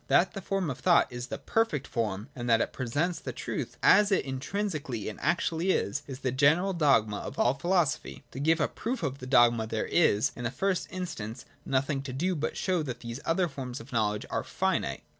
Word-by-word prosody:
That 185 Hz, -, +4 dB
the 195 Hz, -, -5 dB
form 190 Hz, -4 st, -1 dB
of 130 Hz, -, -7 dB
thought 175 Hz, -2 st, +4 dB
is 120 Hz, 0 st, -5 dB
the -, -, -4 dB
perfect 225 Hz, -12 st, 0 dB
form, 105 Hz, -2 st, -2 dB
and 120 Hz, -2 st, -4 dB
that 115 Hz, -1 st, +5 dB
it -, -, -1 dB
presents 145 Hz, +8 st, -1 dB
the -, -, -5 dB
truth -, -, -5 dB
as 205 Hz, 0 st, +6 dB
it 190 Hz, -, +2 dB
intrinsically 140 Hz, -, -3 dB
and 105 Hz, -, -9 dB
actually 170 Hz, +1 st, 0 dB
is, 140 Hz, -, +1 dB
is 135 Hz, -1 st, -7 dB
the 130 Hz, -, 0 dB
general 155 Hz, +9 st, +3 dB
dogma 135 Hz, -, +3 dB
of -, -, -7 dB
all 120 Hz, -, +3 dB
philosophy. 170 Hz, +2 st, 0 dB
To -, -, -7 dB
give 160 Hz, +3 st, +3 dB
a 150 Hz, -, +2 dB
proof 240 Hz, +2 st, -4 dB
of 135 Hz, 0 st, -2 dB
the 125 Hz, -, -7 dB
dogma 120 Hz, -3 st, +4 dB
there 110 Hz, 0 st, -2 dB
is, 110 Hz, -11 st, +3 dB
in 120 Hz, -, -6 dB
the -, -, +1 dB
first 190 Hz, +7 st, -1 dB
instance, 170 Hz, -, -5 dB, 0.2 s
nothing 135 Hz, +1 st, 0 dB
to 135 Hz, -2 st, -6 dB
do 180 Hz, +7 st, 0 dB
but 155 Hz, -1 st, -3 dB
show 185 Hz, -3 st, +1 dB
that 130 Hz, -5 st, -5 dB
these 120 Hz, +1 st, -6 dB
other 175 Hz, +2 st, +2 dB
forms 135 Hz, -4 st, -6 dB
of 120 Hz, +3 st, -12 dB
knowledge 105 Hz, -2 st, 0 dB
are -, -, -1 dB
finite. -, -, -1 dB
140 Hz, 215 wpm, -29 LUFS, 120-175 Hz, 0.2 s, as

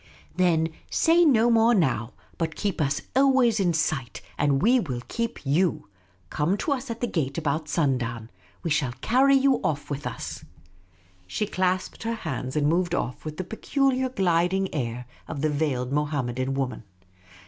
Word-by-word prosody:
\ -, -, -24 dB
" -, -, -30 dB
Then 170 Hz, -3 st, +2 dB, 0.2 s
say 335 Hz, +2 st, +4 dB
no 240 Hz, -6 st, +4 dB
more 230 Hz, +1 st, +5 dB
now, 130 Hz, -, 0 dB, 0.3 s
but 160 Hz, -2 st, -2 dB
keep 200 Hz, -6 st, -2 dB
us 140 Hz, 0 st, 0 dB
always 260 Hz, -5 st, +4 dB
in 180 Hz, -3 st, +2 dB
sight, 155 Hz, -6 st, -1 dB, 0.2 s
and 145 Hz, -2 st, +2 dB
we 245 Hz, -, +4 dB
will 125 Hz, -, -4 dB
keep 230 Hz, -8 st, -4 dB
you. 155 Hz, -, +1 dB, 0.4 s
Come 160 Hz, +6 st, +1 dB
to 290 Hz, -, -2 dB
us 270 Hz, -1 st, -2 dB
at 230 Hz, 0 st, -5 dB
the -, -, +2 dB
gate 150 Hz, -, -2 dB
about 155 Hz, 0 st, -1 dB
sundown. 125 Hz, -7 st, -1 dB, 0.3 s
We 165 Hz, -, -2 dB
will 125 Hz, -4 st, -3 dB
carry 270 Hz, +4 st, +4 dB
you 270 Hz, -1 st, +3 dB
off 145 Hz, -2 st, -2 dB
with 145 Hz, 0 st, -3 dB
us." -, -, -6 dB, 0.8 s
She 150 Hz, -, -1 dB
clasped 185 Hz, -1 st, -1 dB
her 230 Hz, 0 st, -2 dB
hands 130 Hz, -, -4 dB
and 150 Hz, -1 st, +2 dB
moved 175 Hz, +3 st, +1 dB
off 125 Hz, -7 st, -3 dB
with 155 Hz, 0 st, -6 dB
the 185 Hz, -, -2 dB
peculiar 260 Hz, +6 st, 0 dB
gliding 190 Hz, -3 st, +1 dB
air 125 Hz, -4 st, -3 dB, 0.2 s
of 150 Hz, -4 st, -5 dB
the 155 Hz, 0 st, +1 dB
veiled 140 Hz, -4 st, -1 dB
Mohammedan 135 Hz, -3 st, -1 dB
woman. 135 Hz, -2 st, -2 dB
165 Hz, 170 wpm, -25 LUFS, 140-225 Hz, 0.8 s, more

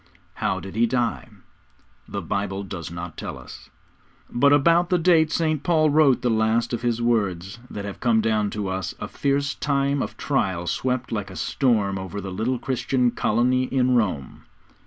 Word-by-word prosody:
How -, -, -1 dB
did 95 Hz, +1 st, -9 dB
he 115 Hz, +1 st, +3 dB
die? 120 Hz, 0 st, -1 dB, 0.8 s
The -, -, -5 dB
Bible 100 Hz, 0 st, -2 dB
does 90 Hz, -3 st, -6 dB
not 85 Hz, -1 st, -7 dB
tell -, -, -5 dB
us. -, -, -12 dB, 0.6 s
But 140 Hz, +4 st, +4 dB
about 170 Hz, +5 st, +4 dB
the 180 Hz, -, +3 dB
date 165 Hz, -2 st, +4 dB
St. 155 Hz, -3 st, 0 dB
Paul 155 Hz, -2 st, +3 dB
wrote 145 Hz, -4 st, +4 dB
the 125 Hz, -, +2 dB
last 110 Hz, +2 st, +1 dB
of 120 Hz, -, -2 dB
his 120 Hz, -1 st, 0 dB
words 100 Hz, -4 st, 0 dB
that 100 Hz, -1 st, -6 dB
have 100 Hz, -, -7 dB
come 115 Hz, -2 st, +3 dB
down 110 Hz, -2 st, +1 dB
to 105 Hz, -1 st, -4 dB
us, 95 Hz, -1 st, -3 dB
a -, -, -4 dB
fierce 140 Hz, 0 st, 0 dB
time 140 Hz, -1 st, 0 dB
of -, -, -5 dB
trial 95 Hz, -11 st, -1 dB
swept 125 Hz, +6 st, -2 dB
like 105 Hz, -4 st, -3 dB
a 95 Hz, -, -10 dB
storm 100 Hz, -, +1 dB
over 95 Hz, +2 st, -6 dB
the 95 Hz, -1 st, -6 dB
little 110 Hz, +7 st, -1 dB
Christian 125 Hz, 0 st, 0 dB
colony 125 Hz, +4 st, +1 dB
in 130 Hz, -1 st, +1 dB
Rome. 95 Hz, -, -1 dB
120 Hz, 180 wpm, -24 LUFS, 100-135 Hz, 0.8 s, But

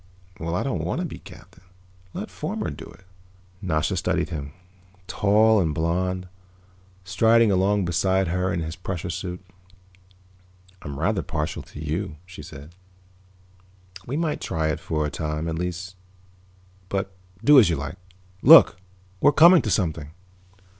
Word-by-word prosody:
"Well, 85 Hz, +1 st, -3 dB
I -, -, -1 dB
don't -, -, -2 dB
want -, -, -2 dB
to -, -, -2 dB
be -, -, -8 dB
captain. 90 Hz, -, -16 dB, 0.5 s
Let -, -, -6 dB
Fomar -, -, -4 dB
do -, -, -9 dB
it." 95 Hz, -, -17 dB, 0.6 s
Nasha 80 Hz, -5 st, -1 dB
studied -, -, -1 dB
him, 70 Hz, -4 st, -6 dB, 0.5 s
tall 105 Hz, +3 st, +3 dB
and 80 Hz, -5 st, 0 dB
blond, 90 Hz, +3 st, -1 dB, 0.8 s
striding 110 Hz, +4 st, +3 dB
along 95 Hz, +1 st, +2 dB
beside 95 Hz, +2 st, +1 dB
her 90 Hz, +1 st, -1 dB
in 85 Hz, -, -2 dB
his 80 Hz, 0 st, -5 dB
pressure 90 Hz, 0 st, -5 dB
suit. 90 Hz, +1 st, -6 dB, 1.4 s
"I'm 70 Hz, -1 st, -7 dB
rather 100 Hz, +6 st, 0 dB
partial 75 Hz, -2 st, -4 dB
to -, -, -12 dB
you," 80 Hz, +3 st, -3 dB
she 90 Hz, -3 st, -11 dB
said. 75 Hz, 0 st, -12 dB, 1.3 s
"We 135 Hz, +4 st, -3 dB
might 160 Hz, -2 st, -2 dB
try 80 Hz, -1 st, -1 dB
it 75 Hz, -, -2 dB
for 75 Hz, -1 st, -2 dB
a 75 Hz, -, -3 dB
time, 75 Hz, 0 st, -3 dB
at 80 Hz, -, -2 dB
least. 90 Hz, +1 st, -5 dB, 0.9 s
But 95 Hz, 0 st, -2 dB, 0.3 s
do 145 Hz, +3 st, +8 dB
as 105 Hz, -8 st, +5 dB
you 85 Hz, -, +1 dB
like. 75 Hz, +5 st, -6 dB, 0.4 s
Look, -, -, +8 dB, 0.4 s
we're 145 Hz, -, +5 dB
coming 170 Hz, +3 st, +7 dB
to 110 Hz, -, -3 dB
something." 80 Hz, -7 st, -1 dB
90 Hz, 145 wpm, -24 LUFS, 80-100 Hz, 1.4 s, do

